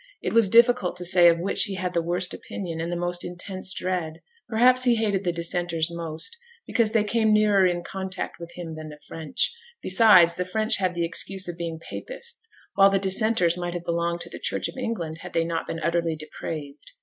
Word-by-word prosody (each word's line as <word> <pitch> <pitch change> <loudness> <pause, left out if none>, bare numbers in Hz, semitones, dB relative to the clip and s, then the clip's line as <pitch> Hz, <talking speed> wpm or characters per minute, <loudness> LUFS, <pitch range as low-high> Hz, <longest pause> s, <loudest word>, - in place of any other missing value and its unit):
It - - -3
was 230 -4 +4
difficult 235 -5 +4
to 180 0 -4
say 175 -1 +7
of 165 - +2
which 180 +4 +3
he 195 - -4
had 185 -1 -3
the 170 - +1
worst 175 +2 -1
opinion 165 -4 -6
and 170 +1 -3
the - - -1
most 175 0 -2
intense 185 +1 -4
dread. 180 -4 -2 0.4
Perhaps 250 +3 +4
he 245 -1 +4
hated 205 -4 0
the 175 - 0
Dissenters 170 -1 -1
most, 170 - -5 0.3
because 230 -3 +1
they 220 -2 +3
came 220 +1 +1
nearer 210 -3 +4
in 175 -1 -2
contact 190 -2 -5
with 170 0 -9
him 170 -2 -7
than 155 0 -8
the 150 0 -12
French; 160 - -1 0.3
besides, 185 - +6
the 180 - -2
French 215 +4 +2
had 185 -2 -1
the 170 -1 0
excuse 190 +3 +1
of 175 - -5
being 165 -1 -5
Papists, 475 - -6 0.3
while 195 0 +6
the 195 - +2
Dissenters 190 -2 +1
might 175 0 -4
have 175 0 -5
belonged 170 0 -1
to - - -8
the - - -8
Church - - -2
of - - -9
England 220 -11 -4
if 180 - -9
they 165 - +2
had 165 - -2
not 165 -1 -3
been 165 - -4
utterly 170 0 0
depraved. 150 -2 -8
180 Hz, 215 wpm, -25 LUFS, 170-200 Hz, 0.4 s, say